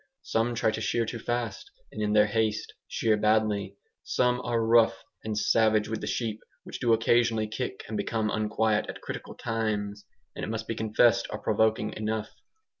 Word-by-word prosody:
Some 115 Hz, +2 st, 0 dB
try 110 Hz, -1 st, +2 dB
to -, -, -4 dB
shear 115 Hz, -1 st, +1 dB
too 115 Hz, +1 st, -5 dB
fast, 120 Hz, -, -3 dB, 0.2 s
and -, -, -6 dB
in 105 Hz, 0 st, +1 dB
their 105 Hz, 0 st, +6 dB
haste 110 Hz, 0 st, -1 dB
shear 110 Hz, -1 st, +1 dB
badly. 105 Hz, -2 st, +1 dB, 0.3 s
Some 125 Hz, 0 st, +1 dB
are 115 Hz, -2 st, 0 dB
rough 110 Hz, -5 st, +4 dB, 0.2 s
and 110 Hz, -1 st, -3 dB
savage 110 Hz, 0 st, +3 dB
with 110 Hz, -, -3 dB
the 105 Hz, -, -4 dB
sheep, 110 Hz, +1 st, -2 dB, 0.2 s
which -, -, -8 dB
do 120 Hz, -, +2 dB
occasionally 115 Hz, -1 st, +3 dB
kick 110 Hz, -1 st, -4 dB
and 110 Hz, -, -5 dB
become 110 Hz, +1 st, -1 dB
unquiet 110 Hz, 0 st, +1 dB
at -, -, -7 dB
critical -, -, -7 dB
times; 105 Hz, -3 st, -2 dB, 0.3 s
and -, -, -6 dB
it -, -, -3 dB
must 110 Hz, 0 st, -4 dB
be -, -, -1 dB
confessed 110 Hz, 0 st, +3 dB
are -, -, -4 dB
provoking 110 Hz, -1 st, +1 dB
enough. 110 Hz, 0 st, -3 dB
110 Hz, 180 wpm, -28 LUFS, 105-115 Hz, 0.3 s, their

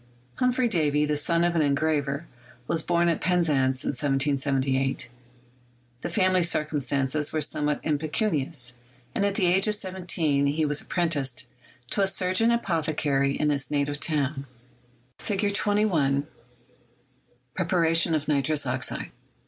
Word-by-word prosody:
Humphrey 250 Hz, 0 st, +2 dB
Davy, 150 Hz, -7 st, +1 dB
the 150 Hz, 0 st, 0 dB
son 170 Hz, +3 st, +2 dB
of 175 Hz, 0 st, +1 dB
an 165 Hz, -, +3 dB
engraver, 145 Hz, 0 st, 0 dB, 0.4 s
was 165 Hz, -, +1 dB
born 170 Hz, +1 st, +1 dB
at 170 Hz, -, 0 dB
Penzance 145 Hz, -8 st, +1 dB
in -, -, -2 dB
1778. 135 Hz, -1 st, 0 dB, 0.9 s
The -, -, -4 dB
family 185 Hz, -3 st, +2 dB
circumstances 150 Hz, -3 st, +1 dB
were 155 Hz, -, -1 dB
some 150 Hz, 0 st, -1 dB
what 150 Hz, -, 0 dB
impecunious, 150 Hz, -, 0 dB, 0.4 s
and -, -, 0 dB
at 200 Hz, -, -2 dB
the 195 Hz, -, +1 dB
age 185 Hz, +4 st, +3 dB
of 210 Hz, -, +2 dB
seventeen 175 Hz, -7 st, 0 dB
he 155 Hz, +2 st, 0 dB
was 145 Hz, 0 st, 0 dB
apprenticed 140 Hz, -9 st, -1 dB, 0.4 s
to 200 Hz, -, 0 dB
a 195 Hz, -, +3 dB
surgeon 185 Hz, +4 st, +2 dB
apothecary 155 Hz, -10 st, 0 dB
in 150 Hz, 0 st, +2 dB
his 140 Hz, -2 st, -1 dB
native 145 Hz, 0 st, -1 dB
town 140 Hz, -2 st, -1 dB, 0.7 s
Fig. 205 Hz, 0 st, -1 dB
21 185 Hz, -9 st, +1 dB, 0.7 s
— 125 Hz, +1 st, -39 dB
Preparation 165 Hz, -2 st, +2 dB
of 155 Hz, -1 st, -2 dB
Nitrous 145 Hz, 0 st, 0 dB
Oxide. 130 Hz, 0 st, -3 dB
155 Hz, 135 wpm, -26 LUFS, 140-175 Hz, 0.9 s, an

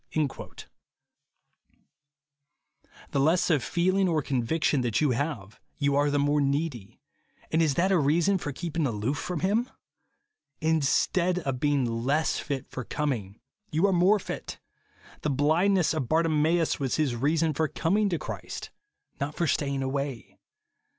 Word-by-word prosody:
The 140 Hz, -, 0 dB
less 165 Hz, +6 st, +3 dB
of 145 Hz, -5 st, +2 dB
feeling 185 Hz, +2 st, +1 dB
or 155 Hz, -3 st, +1 dB
conviction 135 Hz, +3 st, 0 dB
that 120 Hz, -3 st, 0 dB
you 150 Hz, -3 st, +2 dB
have, 120 Hz, -6 st, -3 dB, 0.2 s
you 140 Hz, -3 st, +1 dB
are 145 Hz, +1 st, +3 dB
the 145 Hz, -, +1 dB
more 145 Hz, +1 st, +2 dB
needy; 140 Hz, -6 st, -2 dB, 0.5 s
and 160 Hz, -, +3 dB
is 150 Hz, -4 st, +2 dB
that 185 Hz, +3 st, +2 dB
a 185 Hz, -, +4 dB
reason 170 Hz, +7 st, +2 dB
for 145 Hz, -, -4 dB
keeping 165 Hz, +1 st, -2 dB
aloof 120 Hz, +5 st, -2 dB
from 180 Hz, -4 st, -4 dB
him 210 Hz, +7 st, +2 dB
1 -, -, -26 dB, 0.9 s
In 160 Hz, 0 st, +2 dB
stead 180 Hz, +5 st, +1 dB
of 135 Hz, -7 st, -2 dB
being 145 Hz, -2 st, +2 dB
less 125 Hz, +7 st, 0 dB
fit 140 Hz, -3 st, -4 dB
for 130 Hz, -, -6 dB
coming, 115 Hz, -9 st, -3 dB, 0.3 s
you 160 Hz, +5 st, +2 dB
are 195 Hz, -, +3 dB
more 185 Hz, +4 st, +4 dB
fit. 195 Hz, -, -6 dB, 0.6 s
The 150 Hz, -, -1 dB
blindness 160 Hz, +7 st, +2 dB
of 140 Hz, -7 st, -3 dB
Bartimeus 160 Hz, +1 st, +2 dB
was 135 Hz, -3 st, -1 dB
his 145 Hz, -6 st, 0 dB
reason 155 Hz, +5 st, +1 dB
for 155 Hz, +2 st, 0 dB
coming 200 Hz, +8 st, +1 dB
to 170 Hz, -, 0 dB
Christ, -, -, -7 dB, 0.5 s
not 145 Hz, +2 st, -3 dB
for 170 Hz, -, 0 dB
staying 140 Hz, -3 st, 0 dB
away. 135 Hz, -2 st, -4 dB
150 Hz, 150 wpm, -27 LUFS, 135-170 Hz, 0.9 s, a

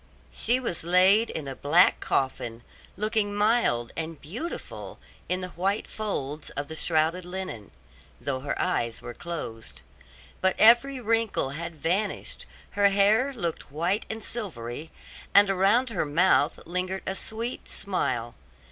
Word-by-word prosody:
She 245 Hz, +3 st, +1 dB
was 230 Hz, -12 st, -3 dB
laid 185 Hz, +6 st, +5 dB
in 155 Hz, -3 st, -5 dB
a 135 Hz, -, -5 dB
black 165 Hz, +8 st, +4 dB
coffin, 120 Hz, -3 st, -1 dB, 0.3 s
looking 215 Hz, -1 st, 0 dB
mild 205 Hz, -, +2 dB
and 165 Hz, -2 st, -4 dB
beautiful 235 Hz, -, -6 dB, 0.3 s
in 185 Hz, +1 st, 0 dB
the 185 Hz, -, -4 dB
white 190 Hz, +4 st, -1 dB
folds 155 Hz, -9 st, -4 dB
of 145 Hz, 0 st, -5 dB
the 160 Hz, -, -7 dB
shrouded 160 Hz, +3 st, +1 dB
linen, 180 Hz, -, -6 dB, 0.5 s
though 135 Hz, -2 st, -2 dB
her 140 Hz, +2 st, -3 dB
eyes 120 Hz, -11 st, -1 dB
were 120 Hz, -, -6 dB
closed; 115 Hz, -, -7 dB, 0.6 s
but 190 Hz, 0 st, +3 dB
every 240 Hz, +4 st, +6 dB
wrinkle 225 Hz, -, +1 dB
had 165 Hz, +3 st, -5 dB
vanished, 185 Hz, +7 st, -2 dB, 0.2 s
her 200 Hz, 0 st, +4 dB
hair 210 Hz, +7 st, +4 dB
looked 170 Hz, -, -4 dB
white 170 Hz, +8 st, 0 dB
and 220 Hz, -1 st, -5 dB
silvery, 155 Hz, -, -6 dB, 0.5 s
and 200 Hz, -1 st, +7 dB
around 205 Hz, +7 st, +3 dB
her 200 Hz, -, 0 dB
mouth 155 Hz, 0 st, +3 dB
lingered 180 Hz, +2 st, -2 dB
a 190 Hz, -, -1 dB
sweet 225 Hz, +5 st, -5 dB
smile. 125 Hz, -12 st, -2 dB
180 Hz, 140 wpm, -27 LUFS, 145-210 Hz, 0.6 s, and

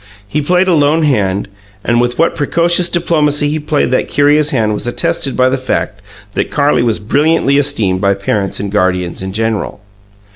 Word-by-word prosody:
He 150 Hz, +8 st, -2 dB
played 180 Hz, +5 st, +1 dB
a 185 Hz, -, +3 dB
lone 155 Hz, +1 st, +2 dB
hand, 100 Hz, -10 st, 0 dB, 0.4 s
and 120 Hz, 0 st, +2 dB
with 120 Hz, 0 st, -1 dB
what 165 Hz, -, +2 dB
precocious 170 Hz, +3 st, +1 dB
diplomacy 150 Hz, -4 st, +1 dB
he 155 Hz, -, -2 dB
played 150 Hz, -4 st, -1 dB
that 130 Hz, -, 0 dB
curious 145 Hz, +1 st, +2 dB
hand 110 Hz, -6 st, 0 dB
was 105 Hz, -, -3 dB
attested 155 Hz, 0 st, -1 dB
by 130 Hz, 0 st, +4 dB
the 130 Hz, +1 st, 0 dB
fact 105 Hz, -5 st, -3 dB, 0.3 s
that -, -, -2 dB
Carlie 145 Hz, 0 st, +1 dB
was 115 Hz, -2 st, +1 dB
brilliantly 145 Hz, +5 st, +1 dB
esteemed 110 Hz, -10 st, 0 dB
by 100 Hz, 0 st, +2 dB
parents 100 Hz, 0 st, -2 dB
and 100 Hz, -1 st, -4 dB
guardians 90 Hz, -3 st, -1 dB
in 95 Hz, 0 st, -5 dB
general. 110 Hz, 0 st, -2 dB
135 Hz, 180 wpm, -13 LUFS, 105-150 Hz, 0.4 s, by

